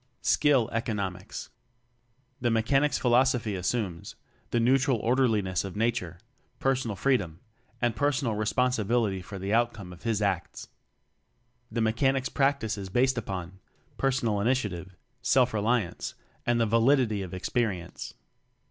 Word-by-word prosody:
Skill 135 Hz, -6 st, +3 dB
Economics. 100 Hz, -6 st, -3 dB, 0.9 s
The 120 Hz, -2 st, +1 dB
Mechanic's 135 Hz, +6 st, +2 dB
philosophy 125 Hz, -3 st, +2 dB
as 90 Hz, -1 st, -3 dB
sumes: 100 Hz, -9 st, -2 dB, 0.3 s
the 120 Hz, -, +1 dB
neutral 130 Hz, +1 st, +3 dB
orderliness 110 Hz, -6 st, +1 dB
of 95 Hz, -1 st, -6 dB
Nature; 105 Hz, -6 st, -1 dB, 0.4 s
personal 130 Hz, -5 st, 0 dB
freedom; 95 Hz, -9 st, 0 dB, 0.4 s
and 120 Hz, -2 st, +1 dB
per 145 Hz, +7 st, +2 dB
sonal 130 Hz, -6 st, -1 dB
responsibility 110 Hz, -2 st, +1 dB
for 100 Hz, +2 st, -8 dB
the 95 Hz, +2 st, -2 dB
outcome 115 Hz, -6 st, 0 dB
of 85 Hz, -, -14 dB
his 115 Hz, -1 st, 0 dB
acts. 100 Hz, -4 st, -2 dB, 1.0 s
The 115 Hz, +1 st, -1 dB
Mechanic's 130 Hz, +4 st, +1 dB
practice 135 Hz, -6 st, 0 dB
is 95 Hz, -1 st, -6 dB
based 130 Hz, +6 st, +2 dB
upon: 95 Hz, -3 st, -6 dB, 0.4 s
personal 120 Hz, -6 st, +1 dB
initiative; 100 Hz, -7 st, -1 dB, 0.3 s
self 125 Hz, 0 st, +3 dB
reli 110 Hz, +3 st, +2 dB
ance; -, -, -7 dB, 0.3 s
and 120 Hz, -1 st, +3 dB
the 115 Hz, -, +3 dB
validity 115 Hz, -1 st, +3 dB
of 95 Hz, -1 st, -6 dB
experience. 95 Hz, -2 st, -3 dB
115 Hz, 130 wpm, -28 LUFS, 100-125 Hz, 1.0 s, Skill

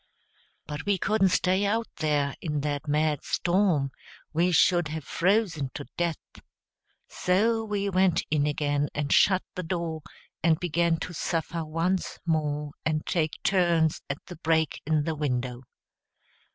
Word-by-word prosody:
But 150 Hz, +5 st, -6 dB
we 200 Hz, -1 st, +3 dB
couldn't 195 Hz, +1 st, +2 dB
stay 185 Hz, +2 st, +2 dB
out 225 Hz, +3 st, +1 dB
there 145 Hz, -3 st, +1 dB
in 150 Hz, -3 st, -2 dB
that 145 Hz, +1 st, -3 dB
mad 150 Hz, 0 st, +1 dB
storm; 175 Hz, -7 st, +1 dB, 0.4 s
we 175 Hz, +3 st, +2 dB
should 175 Hz, 0 st, +4 dB
have 155 Hz, 0 st, -5 dB
frozen 175 Hz, -4 st, +1 dB
to -, -, -5 dB
death. 170 Hz, -2 st, 0 dB, 0.9 s
So 225 Hz, +5 st, +1 dB
we 205 Hz, -2 st, -2 dB
went 185 Hz, -2 st, +2 dB
in 150 Hz, -1 st, +2 dB
again 145 Hz, -1 st, 0 dB
and 150 Hz, 0 st, 0 dB
shut 190 Hz, -2 st, +4 dB
the 185 Hz, -, -4 dB
door, 170 Hz, -2 st, -3 dB, 0.4 s
and 160 Hz, -1 st, +3 dB
began 170 Hz, -1 st, +1 dB
to 180 Hz, -, -5 dB
suffer 165 Hz, 0 st, -2 dB
once 165 Hz, +4 st, -1 dB
more 150 Hz, -3 st, -1 dB
and 155 Hz, -1 st, -1 dB
take 160 Hz, -4 st, -1 dB
turns 170 Hz, -5 st, +2 dB
at 140 Hz, -, -5 dB
the 180 Hz, -, -10 dB
break 160 Hz, -2 st, +1 dB
in 155 Hz, -1 st, +2 dB
the 160 Hz, -, -1 dB
window. 125 Hz, -4 st, -2 dB
165 Hz, 145 wpm, -27 LUFS, 150-185 Hz, 0.9 s, should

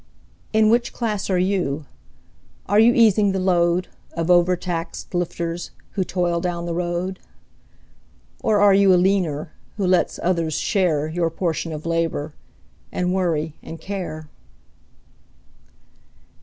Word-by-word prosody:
In 220 Hz, 0 st, +4 dB
which 240 Hz, +1 st, +1 dB
class 215 Hz, -5 st, -2 dB
are 185 Hz, -, +2 dB
you? 180 Hz, -6 st, 0 dB, 0.8 s
Are 205 Hz, -, +3 dB
you 225 Hz, +2 st, +7 dB
easing 215 Hz, -4 st, +4 dB
the 190 Hz, -, -1 dB
load, 180 Hz, -1 st, +2 dB, 0.3 s
Of 165 Hz, +1 st, 0 dB
overtaxed 175 Hz, -1 st, 0 dB
lifters, 170 Hz, -1 st, -3 dB, 0.2 s
who 190 Hz, -, -1 dB
toil 175 Hz, -1 st, -1 dB
down 170 Hz, -1 st, -2 dB
the 170 Hz, -, -3 dB
road? 175 Hz, +2 st, -2 dB, 1.2 s
Or 210 Hz, -2 st, +2 dB
are 200 Hz, -1 st, +6 dB
you 195 Hz, 0 st, +5 dB
a 180 Hz, -, +6 dB
leaner, 175 Hz, -5 st, +1 dB, 0.3 s
who 200 Hz, -, 0 dB
lets 180 Hz, 0 st, +2 dB
others 170 Hz, -4 st, 0 dB
share 155 Hz, -4 st, +1 dB
Your 165 Hz, +1 st, 0 dB
portion 165 Hz, -1 st, -2 dB
of 155 Hz, 0 st, -6 dB
labor, 165 Hz, -3 st, -1 dB, 0.6 s
and 180 Hz, 0 st, -1 dB
worry 165 Hz, -5 st, 0 dB
and 165 Hz, -, -9 dB
care? 180 Hz, -6 st, -5 dB
175 Hz, 130 wpm, -22 LUFS, 165-190 Hz, 1.2 s, you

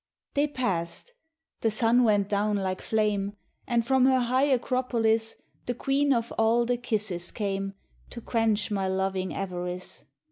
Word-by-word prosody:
They 290 Hz, +1 st, +2 dB
passed; 195 Hz, -, -2 dB, 0.5 s
the 225 Hz, -, +2 dB
sun 230 Hz, +3 st, +3 dB
went 205 Hz, -3 st, +3 dB
down 205 Hz, +1 st, +1 dB
like 190 Hz, -1 st, -2 dB
flame, 210 Hz, -2 st, 0 dB, 0.3 s
And 235 Hz, -1 st, +1 dB
from 265 Hz, 0 st, +4 dB
her 260 Hz, 0 st, +5 dB
high 255 Hz, +3 st, +2 dB
acropolis 235 Hz, -4 st, +1 dB, 0.3 s
The 245 Hz, -, -1 dB
queen 275 Hz, +3 st, +1 dB
of 235 Hz, -3 st, 0 dB
all 230 Hz, +2 st, +3 dB
the 245 Hz, +1 st, 0 dB
kisses 210 Hz, -7 st, -1 dB
came 195 Hz, -1 st, -3 dB, 0.3 s
To 235 Hz, -, -8 dB
quench 225 Hz, -2 st, 0 dB
my 195 Hz, -2 st, 0 dB
loving 190 Hz, 0 st, -1 dB
avarice. 180 Hz, -1 st, -5 dB
220 Hz, 145 wpm, -27 LUFS, 195-245 Hz, 0.5 s, her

